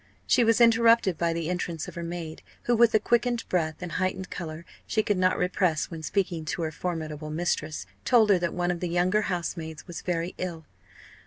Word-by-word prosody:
She 250 Hz, -, +4 dB
was 230 Hz, 0 st, +3 dB
interrupted 230 Hz, -4 st, +5 dB
by 170 Hz, -1 st, +2 dB
the 165 Hz, -1 st, -2 dB
entrance 170 Hz, -2 st, -3 dB
of -, -, -8 dB
her 170 Hz, -, -6 dB
maid, 170 Hz, -2 st, -6 dB, 0.2 s
who, 240 Hz, -, +2 dB
with 235 Hz, 0 st, +5 dB
the 215 Hz, -, +4 dB
quickened 240 Hz, +2 st, +1 dB
breath 160 Hz, -1 st, -1 dB
and 175 Hz, -, -5 dB
heightened 185 Hz, +1 st, -2 dB
colour 165 Hz, -1 st, -6 dB, 0.2 s
she 215 Hz, -, +1 dB
could 205 Hz, -, +1 dB
not 185 Hz, 0 st, +3 dB
repress 180 Hz, -3 st, 0 dB
when 165 Hz, -1 st, -6 dB
speaking 170 Hz, -1 st, -1 dB
to 150 Hz, +2 st, -3 dB
her 160 Hz, -, -2 dB
formidable 155 Hz, -3 st, -4 dB
mistress, 160 Hz, -1 st, -2 dB, 0.2 s
told 225 Hz, -4 st, +5 dB
her 190 Hz, -, +5 dB
that 175 Hz, -1 st, -1 dB
one 175 Hz, 0 st, 0 dB
of 175 Hz, -, -3 dB
the 180 Hz, -, -2 dB
younger 180 Hz, +4 st, +2 dB
housemaids 170 Hz, -4 st, -4 dB
was 175 Hz, -2 st, -7 dB
very 175 Hz, 0 st, -2 dB
ill. 170 Hz, -4 st, -4 dB
175 Hz, 200 wpm, -27 LUFS, 165-200 Hz, 0.2 s, interrupted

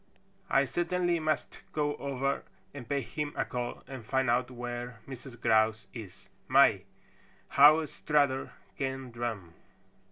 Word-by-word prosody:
I 135 Hz, +1 st, +4 dB
certainly 175 Hz, +2 st, 0 dB
must 155 Hz, 0 st, -2 dB
go 145 Hz, -1 st, 0 dB
over 140 Hz, 0 st, -1 dB, 0.3 s
and 130 Hz, -5 st, -9 dB
pay 140 Hz, -1 st, +1 dB
him 145 Hz, +5 st, -4 dB
a -, -, 0 dB
call 120 Hz, -1 st, -4 dB
and 130 Hz, -3 st, -7 dB
find 130 Hz, +1 st, +1 dB
out 125 Hz, +1 st, +1 dB
where 120 Hz, -1 st, -6 dB
Mrs. 130 Hz, -2 st, -9 dB
Grouse 110 Hz, -2 st, +3 dB
is. 100 Hz, -4 st, -10 dB, 0.2 s
My, 120 Hz, -8 st, +5 dB, 0.6 s
how 155 Hz, +3 st, +7 dB
Strutter 145 Hz, -3 st, +1 dB, 0.2 s
can 135 Hz, -2 st, -3 dB
drum!" 115 Hz, -8 st, -4 dB
130 Hz, 130 wpm, -30 LUFS, 120-145 Hz, 0.6 s, how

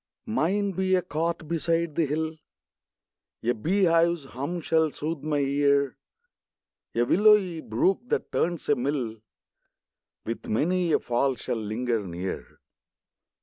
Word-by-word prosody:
Mine 205 Hz, -2 st, 0 dB
be 190 Hz, 0 st, +1 dB
a 180 Hz, -, +1 dB
cot 165 Hz, -1 st, -2 dB
beside 165 Hz, 0 st, 0 dB
the 160 Hz, 0 st, +1 dB
hill, 160 Hz, +2 st, -2 dB, 1.1 s
A 120 Hz, +2 st, +2 dB
bee 185 Hz, -, 0 dB
hive's 170 Hz, -2 st, +3 dB
hum 140 Hz, +7 st, -4 dB
shall 160 Hz, 0 st, +2 dB
sooth 155 Hz, +2 st, -4 dB
my 150 Hz, -1 st, -1 dB
ear; 140 Hz, 0 st, +2 dB, 1.0 s
A 120 Hz, -, +3 dB
willowy 190 Hz, -, +4 dB
brook, 140 Hz, -, +1 dB
that -, -, -1 dB
turns 175 Hz, -1 st, -1 dB
a 145 Hz, -, +5 dB
mill, 125 Hz, -4 st, -2 dB, 1.0 s
With 115 Hz, +1 st, -5 dB
many 175 Hz, +9 st, +1 dB
a -, -, +5 dB
fall 125 Hz, +2 st, 0 dB
shall -, -, -3 dB
linger 110 Hz, +1 st, -1 dB
near. 90 Hz, +2 st, -6 dB
155 Hz, 130 wpm, -26 LUFS, 130-170 Hz, 1.1 s, a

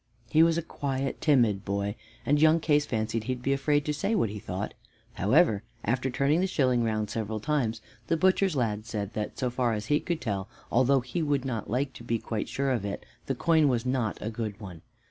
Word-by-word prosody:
He 155 Hz, -, +5 dB
was 165 Hz, 0 st, +5 dB
a 170 Hz, -, -1 dB
quiet, 135 Hz, -2 st, -3 dB
timid 115 Hz, -, +3 dB
boy, 100 Hz, +1 st, -2 dB, 0.3 s
and 145 Hz, +1 st, +3 dB
young 160 Hz, +1 st, +6 dB
Case 150 Hz, -2 st, +2 dB
fancied 110 Hz, 0 st, -1 dB
that 110 Hz, -, -11 dB
he 130 Hz, -, +1 dB
would 125 Hz, -, -13 dB
be 135 Hz, -, +2 dB
afraid 145 Hz, +1 st, +1 dB
to 150 Hz, -, 0 dB
say 200 Hz, +9 st, 0 dB
what 115 Hz, -, +1 dB
he 105 Hz, -, -6 dB
thought. 95 Hz, +1 st, -4 dB, 0.4 s
However, 110 Hz, -, +3 dB, 0.2 s
after 125 Hz, +4 st, 0 dB
turning 140 Hz, +5 st, +2 dB
the 190 Hz, -, +2 dB
shilling 130 Hz, -8 st, +2 dB
round 110 Hz, -2 st, -1 dB
several 110 Hz, -1 st, -3 dB
times, 115 Hz, -4 st, -1 dB, 0.3 s
the 165 Hz, -, +2 dB
butcher's 185 Hz, 0 st, +3 dB
lad 110 Hz, -4 st, -1 dB
said 105 Hz, -2 st, -4 dB
that 105 Hz, -1 st, -4 dB
so 125 Hz, -2 st, -1 dB
far 125 Hz, -1 st, +1 dB
as 105 Hz, -1 st, -3 dB
he 150 Hz, -, +4 dB
could 170 Hz, -3 st, -2 dB
tell, 100 Hz, -4 st, -3 dB, 0.2 s
although 130 Hz, +2 st, +4 dB
he 130 Hz, +8 st, -3 dB
would 145 Hz, -4 st, 0 dB
not 115 Hz, -4 st, -3 dB
like 130 Hz, +4 st, -1 dB
to -, -, -11 dB
be 115 Hz, 0 st, 0 dB
quite 110 Hz, -1 st, -4 dB
sure 135 Hz, 0 st, 0 dB
of 120 Hz, -6 st, 0 dB
it, 100 Hz, -1 st, -4 dB, 0.2 s
the 135 Hz, -, 0 dB
coin 160 Hz, +2 st, +3 dB
was 125 Hz, -3 st, +1 dB
not 125 Hz, -4 st, 0 dB
a 110 Hz, -, -3 dB
good 110 Hz, -3 st, -4 dB
one. 90 Hz, -6 st, -9 dB
125 Hz, 225 wpm, -28 LUFS, 110-145 Hz, 0.4 s, young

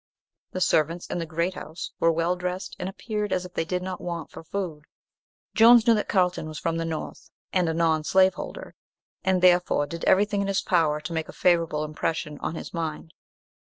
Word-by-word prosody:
The 185 Hz, -, -4 dB
servants 165 Hz, +1 st, +2 dB
in -, -, -4 dB
the 165 Hz, -, -4 dB
"Great 170 Hz, +3 st, -1 dB
House" 165 Hz, -1 st, -7 dB
were 165 Hz, -, +4 dB
well 165 Hz, +2 st, +1 dB
dressed, 180 Hz, +1 st, -4 dB
and 180 Hz, -, -3 dB
appeared 210 Hz, 0 st, -4 dB
as 185 Hz, 0 st, 0 dB
if 180 Hz, -, -11 dB
they 165 Hz, -, -1 dB
did 180 Hz, +2 st, -2 dB
not 185 Hz, -1 st, -5 dB
want 170 Hz, -1 st, -5 dB
for -, -, -10 dB
food. 160 Hz, -4 st, -5 dB, 0.7 s
Jones 235 Hz, +1 st, +7 dB
knew 235 Hz, -, +6 dB
that 210 Hz, -, -1 dB
Carlton 180 Hz, -4 st, +1 dB
was 155 Hz, -1 st, -7 dB
from 165 Hz, 0 st, -1 dB
the 165 Hz, -, -2 dB
North, 160 Hz, -1 st, -6 dB, 0.2 s
and 180 Hz, -3 st, +2 dB
a -, -, 0 dB
non 160 Hz, -2 st, +2 dB
slaveholder, 190 Hz, -, +1 dB, 0.5 s
and 185 Hz, -1 st, +1 dB
therefore 180 Hz, -4 st, +4 dB
did 170 Hz, +3 st, -7 dB
everything 205 Hz, +1 st, +3 dB
in 200 Hz, -, -1 dB
his 195 Hz, -1 st, 0 dB
power 160 Hz, -5 st, +2 dB
to 160 Hz, +2 st, -6 dB
make 160 Hz, -1 st, -3 dB
a -, -, -8 dB
favourable 165 Hz, -4 st, +2 dB
impression 155 Hz, 0 st, -3 dB
on 165 Hz, -, -3 dB
his -, -, -7 dB
mind. 160 Hz, -1 st, -4 dB
175 Hz, 200 wpm, -26 LUFS, 160-185 Hz, 0.7 s, Jones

